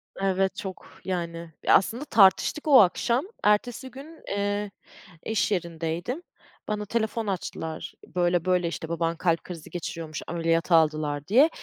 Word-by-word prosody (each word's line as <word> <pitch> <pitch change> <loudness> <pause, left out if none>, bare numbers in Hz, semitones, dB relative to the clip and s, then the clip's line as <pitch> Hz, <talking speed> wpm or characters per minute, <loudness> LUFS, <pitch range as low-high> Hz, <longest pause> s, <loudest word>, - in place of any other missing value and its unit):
Evet, 195 0 0
çok, 190 -2 -8
yani, 170 -2 -4
e, - - +2
aslında 235 +9 +3
tartıştık 220 +8 +4
o 270 -6 +9
akşam. 235 - +2 0.2
Ertesi 245 +5 +1
gün, 295 +6 -12
eee, 205 0 -1 0.5
iş 220 -1 0
yerindeydim. 170 - -3 0.4
Bana 210 0 -2
telefon 220 0 -1
açtılar, 165 -4 -4 0.2
böyle, 175 -1 +2
böyle 180 -1 +2
işte 165 -1 -5
baban 165 0 -1
kalp 170 -1 +1
krizi 170 -4 -9
geçiriyormuş, 165 -2 -5
ameliyata 165 0 +1
aldılar 150 -2 +1
diye, 265 +10 +6
185 Hz, 135 wpm, -26 LUFS, 165-215 Hz, 0.5 s, o